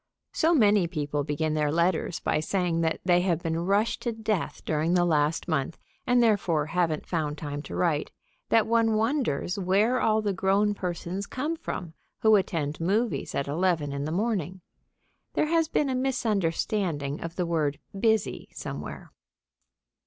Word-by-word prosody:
So 330 +2 +3
many 205 - +4
people 145 -3 -2
begin 155 +2 -1
their 150 -1 +1
letters 170 +1 +1
by 150 - 0
saying 170 0 0
that 160 -1 0
they 180 -1 +4
have 175 -2 0
been 165 -1 -1
rushed 200 +6 +1
to 240 - -1
death 220 -4 -2
during 160 +3 +1
the 175 -1 +4
last 155 0 +1
month, 155 -2 -1 0.3
and 245 -1 +4
therefore 180 -9 +2
haven't 165 -1 0
found 155 -4 -2
time 145 -1 -5
to - - -8
write, 160 -4 +1 0.4
that 225 -1 +4
one 225 -1 +2
wonders 220 - 0
where 205 +7 +2
all 215 0 +2
the 205 -2 0
grown 195 +2 +2
persons 180 +1 -4
come 295 +6 -2
from 180 - -6 0.3
who 220 -1 +6
attend 160 -6 -1
movies 210 +7 0
at 140 - -1
eleven 155 -2 0
in 140 0 -3
the 155 - -3
morning. 190 -2 -1 0.7
There - - +2
has 330 -1 +3
been 300 - +1
a 265 - -1
misunderstanding 195 - -1
of 165 0 -6
the 180 - -1
word 155 -4 0 0.2
"busy" 220 0 0
somewhere. - - -7
180 Hz, 160 wpm, -27 LUFS, 155-215 Hz, 0.7 s, who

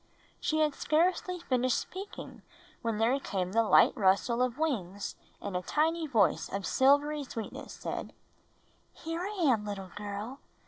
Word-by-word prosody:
She 310 - 0
had 300 -1 +3
scarcely 360 +4 +1
finished 255 -5 +1
speaking 390 +2 -7 0.4
when 230 -2 -1
there 235 +5 +2
came 185 -8 -2
the 230 +3 +4
light 225 - +5
rustle 210 +4 +2
of 250 -1 0
wings; 205 - -2 0.2
and 200 -2 -5
a 180 - 0
tiny 320 - +1
voice 225 -9 +2
of 195 -1 -3
silvery 290 +2 +3
sweetness 230 -5 -7
said, - - -5 0.8
"Here 330 +1 -5
I 390 -1 -2
am, 245 -8 +3
little 195 -3 -6
girl. 210 +5 -5
250 Hz, 145 wpm, -30 LUFS, 205-310 Hz, 0.8 s, light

